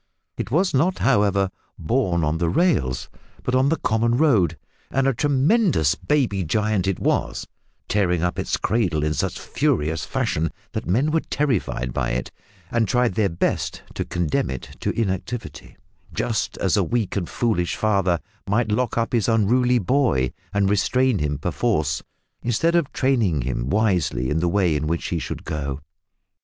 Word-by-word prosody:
It -, -, -4 dB
was 180 Hz, +9 st, +2 dB
not 170 Hz, +8 st, +2 dB
however 100 Hz, -6 st, +2 dB, 0.3 s
born 90 Hz, -4 st, 0 dB
on 75 Hz, +2 st, 0 dB
the 85 Hz, -1 st, +1 dB
rails, 80 Hz, -, +1 dB, 0.4 s
but 125 Hz, -, -2 dB
on 130 Hz, +2 st, +3 dB
the 165 Hz, -, +3 dB
common 115 Hz, +2 st, +1 dB
road, 105 Hz, -, +3 dB, 0.3 s
and 135 Hz, 0 st, +1 dB
a 135 Hz, -, +3 dB
tremendous 145 Hz, -, +2 dB
baby 125 Hz, -10 st, 0 dB
giant 105 Hz, +2 st, 0 dB
it 95 Hz, -, 0 dB
was, -, -, 0 dB, 0.4 s
tearing 90 Hz, -4 st, +1 dB
up 90 Hz, -, -1 dB
its -, -, -1 dB
cradle 90 Hz, -10 st, 0 dB
in 75 Hz, 0 st, +1 dB
such -, -, -2 dB
furious 75 Hz, 0 st, 0 dB
fashion 80 Hz, +3 st, -1 dB, 0.2 s
that -, -, -4 dB
men 125 Hz, -, +2 dB
were 160 Hz, -, +3 dB
terrified 110 Hz, -, -1 dB
by -, -, -1 dB
it, 60 Hz, -, -3 dB, 0.4 s
and 115 Hz, -2 st, +1 dB
tried 125 Hz, -5 st, +2 dB
their 100 Hz, 0 st, +1 dB
best 85 Hz, -, -2 dB
to -, -, -2 dB
condemn 85 Hz, -7 st, -1 dB
it 65 Hz, -2 st, -7 dB
to -, -, -1 dB
inactivity, 110 Hz, +3 st, -4 dB, 0.3 s
just -, -, -2 dB
as -, -, +1 dB
a -, -, +3 dB
weak 115 Hz, -5 st, -1 dB
and 90 Hz, -4 st, -2 dB
foolish 110 Hz, -8 st, 0 dB
father 95 Hz, -5 st, +1 dB, 0.3 s
might 110 Hz, +1 st, +1 dB
lock 120 Hz, +3 st, 0 dB
up 115 Hz, +1 st, 0 dB
his 115 Hz, -2 st, +2 dB
unruly 120 Hz, +3 st, +3 dB
boy 115 Hz, -, +1 dB, 0.2 s
and 100 Hz, -1 st, +2 dB
restrain 125 Hz, +4 st, +2 dB
him 75 Hz, -1 st, -1 dB
perforce, 75 Hz, -, 0 dB, 0.4 s
instead 120 Hz, +9 st, +1 dB
of 170 Hz, -5 st, +1 dB
training 110 Hz, -, +1 dB
him -, -, -2 dB
wisely 85 Hz, -, +1 dB
in 80 Hz, -, +1 dB
the 85 Hz, +1 st, +1 dB
way 90 Hz, -4 st, +2 dB
in 75 Hz, +1 st, -1 dB
which 85 Hz, +2 st, -2 dB
he 85 Hz, -, -1 dB
should -, -, -6 dB
go. 70 Hz, -3 st, -3 dB
100 Hz, 165 wpm, -23 LUFS, 80-125 Hz, 0.4 s, on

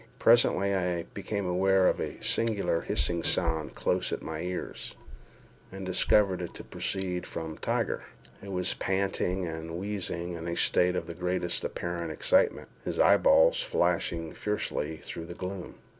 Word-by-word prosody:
Presently 115 Hz, -5 st, +4 dB
I 90 Hz, -3 st, 0 dB
became 100 Hz, 0 st, -3 dB
aware 95 Hz, +1 st, +3 dB
of -, -, +2 dB
a -, -, -4 dB
singular 100 Hz, -7 st, +1 dB
hissing 85 Hz, -1 st, 0 dB
sound 80 Hz, -4 st, 0 dB
close -, -, 0 dB
at -, -, -3 dB
my 80 Hz, -1 st, -4 dB
ears, 90 Hz, 0 st, -5 dB, 0.8 s
and 95 Hz, 0 st, -6 dB
discovered 95 Hz, 0 st, +3 dB
it 85 Hz, -, -6 dB
to -, -, -8 dB
proceed 90 Hz, -2 st, -3 dB
from 80 Hz, -1 st, -5 dB
Tiger, -, -, -1 dB, 0.4 s
who 100 Hz, -, -9 dB
was 90 Hz, -1 st, +1 dB
panting 95 Hz, -1 st, 0 dB
and 80 Hz, 0 st, -5 dB
wheezing 90 Hz, -3 st, -3 dB
in 85 Hz, 0 st, -6 dB
a 85 Hz, -, -2 dB
state 90 Hz, +1 st, +3 dB
of 85 Hz, -, -2 dB
the 85 Hz, -, -6 dB
greatest 90 Hz, 0 st, -1 dB
apparent 85 Hz, -1 st, -3 dB
excitement, 280 Hz, -, +2 dB, 0.2 s
his -, -, -3 dB
eyeballs -, -, +6 dB
flashing 85 Hz, -, 0 dB
fiercely 80 Hz, -7 st, -2 dB
through 80 Hz, +1 st, -6 dB
the 85 Hz, -, -7 dB
gloom. 90 Hz, -1 st, -6 dB
90 Hz, 150 wpm, -29 LUFS, 85-100 Hz, 0.8 s, eyeballs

